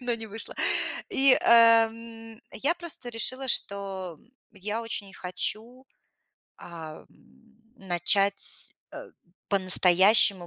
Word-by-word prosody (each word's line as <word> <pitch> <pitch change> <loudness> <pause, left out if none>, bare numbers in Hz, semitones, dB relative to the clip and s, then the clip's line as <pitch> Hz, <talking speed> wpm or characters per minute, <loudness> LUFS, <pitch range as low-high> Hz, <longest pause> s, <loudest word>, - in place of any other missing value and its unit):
но 245 -1 -2
не 225 -1 -8
вышло. 220 +2 -4 0.5
И, 270 -1 +4
а, 230 -1 +5
м, 225 0 -14
я 285 +9 -2
просто 340 -7 -9
решила, 255 +3 -1
что 195 -6 -2 0.3
я 210 +3 -6
очень 205 -4 -6
хочу, 220 +8 -6 0.7
а, 160 -3 -11 0.7
начать, 195 +1 +1 0.2
а, - - -10 0.4
по-настоящему 190 0 +3
220 Hz, 100 wpm, -25 LUFS, 190-230 Hz, 0.7 s, а